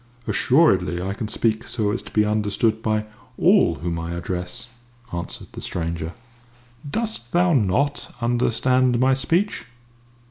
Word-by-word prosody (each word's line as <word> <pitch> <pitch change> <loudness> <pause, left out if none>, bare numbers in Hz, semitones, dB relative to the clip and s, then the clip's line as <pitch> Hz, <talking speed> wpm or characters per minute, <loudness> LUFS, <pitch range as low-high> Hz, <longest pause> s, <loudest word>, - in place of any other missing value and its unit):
"Assuredly 95 - +3
I 95 +2 -2
can 110 +2 -4
speak 110 +1 0
so 105 -4 0
as 120 - -2
to - - -12
be 105 -1 +3
understood 110 +1 +1
by 110 -1 0 0.3
all 185 - +4
whom 85 +3 -3
I 85 +1 -4
address," 90 +5 -4 0.5
answered 85 0 -5
the - - -8
stranger. 85 -1 -3 0.8
"Dost 215 - -3
thou 175 0 +4
not 125 +3 +1
understand 120 +1 +2
my 130 +1 +4
speech?" 170 +10 0
110 Hz, 135 wpm, -23 LUFS, 90-130 Hz, 0.8 s, all